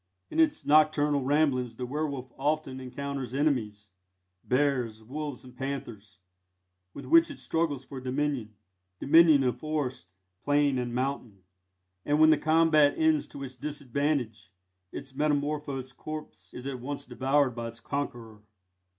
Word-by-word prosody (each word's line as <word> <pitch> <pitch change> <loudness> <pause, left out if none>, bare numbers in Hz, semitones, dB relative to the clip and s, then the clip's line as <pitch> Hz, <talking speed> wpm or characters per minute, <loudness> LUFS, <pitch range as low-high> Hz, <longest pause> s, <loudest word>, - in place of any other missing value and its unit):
In - - -2
its 310 -2 +2
nocturnal 150 -1 +4
ramblings 130 -4 +1
the 125 - -4
werwolf 140 -2 -4
often 145 -2 -1
encounters 130 -1 -5
enemies 110 -8 -1 0.5
bears, 125 -5 0
wolves, 145 +2 -6
and 125 -1 -14
panthers 120 -7 -6 0.8
with 140 - -8
which 165 +5 +5
it - - -8
struggles 150 -5 -1
for 135 -1 -8
dominion 130 -4 -2 0.4
dominion 155 -1 +6
of 125 -1 0
forest, 130 - -4 0.3
plain 145 -2 +2
and 120 -1 -3
mountain; 125 -7 -3 0.6
and 150 +1 +1
when 155 0 +7
the 155 - +5
combat 155 -2 +4
ends 160 -2 +2
to 140 - -8
its 130 -1 -6
disadvantage, 140 -6 -2 0.4
its 135 -1 -8
metamorphosed 145 -3 -1
corpse 155 0 -8
is 125 - -9
at 135 -2 -4
once 140 +3 -5
devoured 135 -1 +1
by 115 0 -5
its 115 0 -8
conqueror. 120 -6 -5
140 Hz, 135 wpm, -28 LUFS, 125-150 Hz, 0.8 s, when